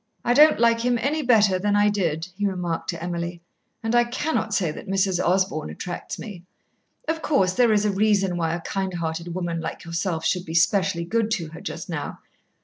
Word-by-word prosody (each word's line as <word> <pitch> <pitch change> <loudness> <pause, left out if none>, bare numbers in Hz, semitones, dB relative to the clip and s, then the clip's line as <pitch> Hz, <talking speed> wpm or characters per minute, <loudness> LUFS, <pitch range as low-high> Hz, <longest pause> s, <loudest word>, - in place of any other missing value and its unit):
"I 240 - +3
don't 300 +1 +6
like 230 0 +4
him 245 +1 +1
any 295 +6 0
better 210 -8 +4
than 205 +2 +1
I 205 0 +4
did," 170 -5 -1
he 205 +1 0
remarked 180 -4 -3
to 170 -1 -3
Emily. 170 0 -3 0.4
"And 225 +1 -1
I 240 0 +5
cannot 240 -1 -2
say 180 -6 +1
that - - -9
Mrs. 190 -1 +1
Osborn 185 -3 +1
attracts 175 -2 -6
me. 195 -6 -8 0.6
Of 320 0 -1
course 190 - +2
there 235 +3 +4
is 210 -1 +3
a 210 - +2
reason 195 -2 +2
why 165 -1 0
a 175 - -5
kind 190 +1 -3
hearted 170 +1 -4
woman 170 -2 -2
like - - -5
yourself 165 -1 -2
should 180 +2 +1
be 160 -2 -6
specially 180 0 +2
good 225 +4 0
to 170 -7 -3
her 165 +2 -10
just 170 +4 -6
now. 160 -5 -4
190 Hz, 205 wpm, -24 LUFS, 170-215 Hz, 0.6 s, don't